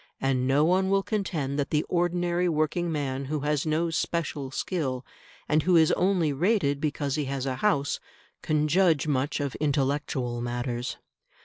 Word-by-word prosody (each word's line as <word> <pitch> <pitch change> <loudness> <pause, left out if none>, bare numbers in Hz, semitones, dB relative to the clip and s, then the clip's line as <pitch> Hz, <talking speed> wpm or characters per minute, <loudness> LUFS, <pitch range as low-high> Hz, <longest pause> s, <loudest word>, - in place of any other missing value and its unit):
And 130 -1 +1
no 140 +3 +4
one 190 +3 +2
will 195 0 +2
contend 160 -11 -2
that 140 - -1
the 150 0 +1
ordinary 175 0 +1
working 165 +2 0
man 140 -3 -2
who 150 +1 -2
has 150 +1 0
no 165 +2 +1
special 160 -4 -2
skill, 130 -3 -2 0.4
and 155 +1 +3
who 180 +3 +3
is 160 -2 +5
only 180 -5 +2
rated 150 -3 +1
because 145 -2 -1
he 150 0 -1
has 135 -1 -3
a 130 -1 -2
house, 145 -6 +1 0.4
can 155 0 +1
judge 165 -2 +3
much 145 0 0
of 140 -2 -2
intellectual 140 -4 -1
matters. 120 0 -3
150 Hz, 165 wpm, -27 LUFS, 135-170 Hz, 0.4 s, is